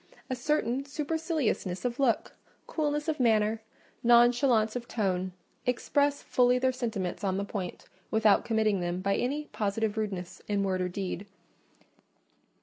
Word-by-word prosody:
A - - +1
certain 260 -1 0
superciliousness 295 - -2
of 245 +1 -2
look, 255 -5 +1 0.3
coolness 295 -1 -1
of 315 -2 -1
manner, 220 -2 +3 0.4
nonchalance 240 -1 +4
of 240 -1 -4
tone, 185 -5 -1 0.4
express 285 +3 +1
fully 250 0 +3
their 260 +1 +2
sentiments 220 -7 -3
on 190 -1 0
the 200 - -1
point, 190 -4 -5 0.2
without 220 -2 +4
committing 220 -4 +1
them 175 0 -2
by 195 +1 +1
any 290 +4 -1
positive 215 +1 -1
rudeness 190 -5 -4
in 205 -1 +1
word 185 -1 0
or 180 - 0
deed. 195 +1 -4
225 Hz, 140 wpm, -29 LUFS, 200-255 Hz, 0.4 s, nonchalance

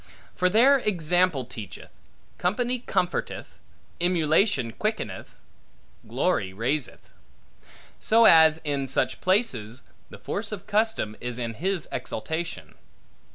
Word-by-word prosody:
For 185 - +1
there 260 +8 +5
example 175 - +1
teacheth, 110 -4 -10 0.5
company 240 +7 0
comforteth, 185 -6 -3 0.4
emulation 160 - +2
quickeneth, 200 - -4 0.7
glory 95 -1 0
raiseth: 125 +6 -3 0.9
so 230 +1 +4
as 160 -4 +7
in 140 -3 -2
such 130 - -1
places 135 - 0 0.3
the - - -11
force 205 +1 -4
of 200 -2 -6
custom 210 - 0
is 125 -1 -4
in 115 -2 -3
his 180 - -2
exaltation. 160 +10 -5
170 Hz, 105 wpm, -25 LUFS, 125-210 Hz, 0.9 s, as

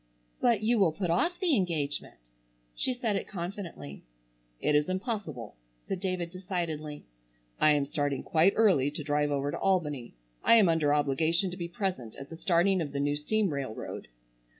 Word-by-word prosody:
"But 230 -4 +2
you 230 +1 +3
will 175 -6 +4
put 180 -1 -2
off 345 - +1
the 350 -6 +3
engagement." 145 - -2 0.4
She - - +1
said 245 -4 -1
it 195 - -3
confidently. 170 - -7 0.6
"It 150 - +1
is 150 +3 +3
impossible!" 185 - -4 0.3
said 190 - -2
David 180 -3 -2
decidedly. 170 -6 -4 0.5
"I 155 - +6
am 145 -1 +1
starting 145 -2 -2
quite 170 +5 +3
early 185 -12 +4
to 150 +1 -5
drive 145 0 +1
over 140 0 -1
to - - -4
Albany. 150 - 0 0.3
I - - +6
am 210 -6 +6
under 160 -3 +2
obligation 155 +5 +2
to - - -5
be 170 -2 -4
present 170 - -3
at 135 +3 -10
the - - -6
starting 180 +2 +2
of 145 -3 -4
the 140 - -2
new 145 +1 +1
steam 195 +4 +1
railroad." 135 - -5
165 Hz, 175 wpm, -29 LUFS, 145-195 Hz, 0.6 s, I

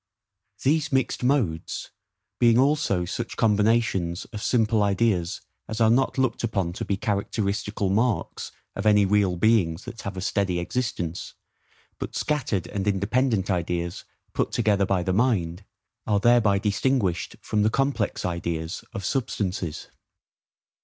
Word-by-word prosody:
These 150 +2 +2
mixed 130 -1 0
modes, 120 - 0 0.5
being 115 -1 +5
also 135 - +2
such 115 +6 -5
combinations 105 -5 +2
of 105 - -5
simple 110 -2 +2
ideas 100 -3 +1 0.3
as 110 +1 -4
are 110 -1 +5
not 130 +3 +2
looked 130 -3 0
upon 95 -7 -1
to - - -5
be 100 - -1
characteristical 105 0 -1
marks 115 +3 0 0.2
of 100 +2 -1
any 105 -1 +5
real 100 -2 +2
beings 90 -3 +2
that 120 -2 -8
have 100 -1 -6
a - - -3
steady 95 -1 0
existence, 90 -3 -3 0.6
but - - -5
scattered 125 - -1
and 100 0 -4
independent 105 +1 +1
ideas 85 -1 -2 0.3
put - - 0
together 100 -4 +2
by 95 -3 +1
the 95 - 0
mind, 100 -5 +1 0.4
are 105 -1 +3
thereby 115 -3 +4
distinguished 100 -2 0
from 105 - -1
the 105 - +4
complex 135 -4 0
ideas 85 -1 -3
of 100 -5 -5
substances. 95 - -2
105 Hz, 135 wpm, -25 LUFS, 95-115 Hz, 0.6 s, being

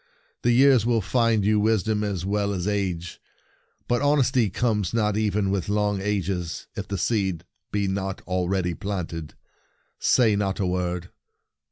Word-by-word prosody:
" - - -41
The 120 - +2
years 130 -1 +5
will 115 0 +2
find 115 -1 +1
you 105 0 +3
wis 110 -2 +2
dom 105 -1 0
as 95 -4 -2
well 100 0 0
as 90 0 -3
age; 95 -4 -2 0.7
but 120 +1 +1
hon 145 +1 +3
esty 125 -5 +2
comes 105 -1 0
not 105 -2 +1
even 105 -2 0
with 100 -1 -1
long 105 -1 0
ages 95 -6 -2
if - - -5
the 100 - -3
seed 95 -4 0 0.3
be 100 -1 0
not 95 0 -3
already 90 0 -1
planted. 85 -5 -5 0.6
Say 115 -4 +4
not 100 -1 -1
a 100 - +1
word." 90 -1 -2
100 Hz, 165 wpm, -25 LUFS, 90-110 Hz, 0.7 s, years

